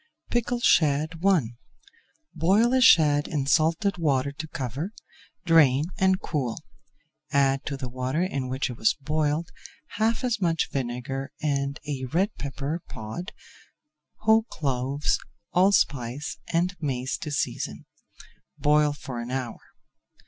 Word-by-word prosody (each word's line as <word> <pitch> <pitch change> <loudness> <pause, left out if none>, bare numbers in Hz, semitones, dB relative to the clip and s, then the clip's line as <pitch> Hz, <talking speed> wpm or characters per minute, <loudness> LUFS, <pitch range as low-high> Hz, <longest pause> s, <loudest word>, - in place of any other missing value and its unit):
PICKLED 240 0 0
SHAD 150 -1 +4
I 195 -4 +5 0.9
Boil 195 +9 +3
a 260 - +4
shad 150 - +6
in 145 -5 -2
salted 165 +7 +2
water 140 -3 +1
to 155 +3 -7
cover, 140 - -4 0.5
drain 150 -5 +5
and 190 0 +3
cool. 130 -8 -3 0.7
Add 135 -1 +2
to 140 - -3
the 130 -2 -5
water 130 +6 -1
in 140 -8 -2
which 130 0 -2
it 120 - -9
was 110 - +3
boiled 155 +3 -1 0.5
half 225 +2 +1
as 235 -4 0
much 165 -3 +1
vinegar 135 +2 -3
and 140 -1 -1
a 135 -3 -3
red 185 - 0
pepper 145 +4 -4
pod, 110 +12 -6 0.9
whole 220 +1 +5
cloves, 135 0 -1 0.3
allspice, 145 -8 +1
and 175 +3 +1
mace 130 -3 -2
to 155 - -5
season. 145 - -3 0.7
Boil 150 0 +3
for 135 -4 -7
an 120 +1 -5
hour. 130 -3 -4
145 Hz, 125 wpm, -26 LUFS, 135-175 Hz, 0.9 s, shad